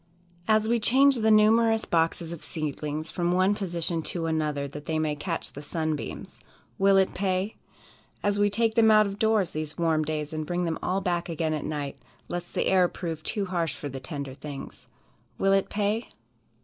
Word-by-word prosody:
As 215 0 +3
we 235 +1 +2
change 270 +4 +5
the 220 -1 +2
numerous 225 +1 +5
boxes 165 0 0
of 170 - -9
seedlings 155 0 -4
from 175 -1 0
one 185 +3 +3
position 175 -4 -2
to 165 +1 -3
another, 150 -3 -1
that 145 +1 -9
they 160 - 0
may 155 -1 0
catch 165 +3 -4
the 145 - -8
sunbeams, 155 0 -4 0.4
"Will 195 0 +5
it 190 -1 +3
pay?" 190 +2 -1 0.7
As 205 0 +1
we 205 0 +4
take 225 +2 +1
them 225 -1 +5
out 215 0 +6
of 200 0 -5
doors 220 -5 +2
these 155 0 -4
warm 160 -2 +2
days, 155 0 -3
and 155 0 -2
bring 175 +3 -1
them 165 -1 -2
all 190 +2 0
back 175 -2 -1
again 160 -1 -1
at 155 - -3
night, 145 -2 -4 0.3
lest 175 0 -5
the - - +1
air 185 -2 +4
prove 165 -3 -5
too 205 +5 -2
harsh 170 -5 -1
for 145 - -6
the 135 0 -6
tender 140 -1 -5
things, 140 0 -9 0.5
"Will 195 0 +3
it 195 0 +2
pay?" 210 +3 -1
175 Hz, 190 wpm, -27 LUFS, 155-205 Hz, 0.7 s, out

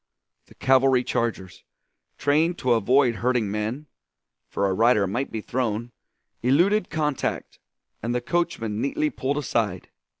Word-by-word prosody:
The - - -19
cavalry 130 -1 +3
chargers, 115 -7 -3 0.5
trained 155 +5 +2
to 125 -1 +2
avoid 120 +2 +3
hurting 120 -4 0
men 110 +8 -3 0.6
for 100 - 0
a 95 - 0
rider 110 0 +3
might 120 +9 -2
be 110 - -4
thrown 120 -1 -2 0.5
eluded 175 - +3
contact, 150 -3 -2 0.4
and 120 +2 -2
the - - +2
coachman 120 -8 -2
neatly 150 +2 0
pulled 135 +3 -2
aside. 110 - -2
125 Hz, 130 wpm, -24 LUFS, 110-145 Hz, 0.6 s, cavalry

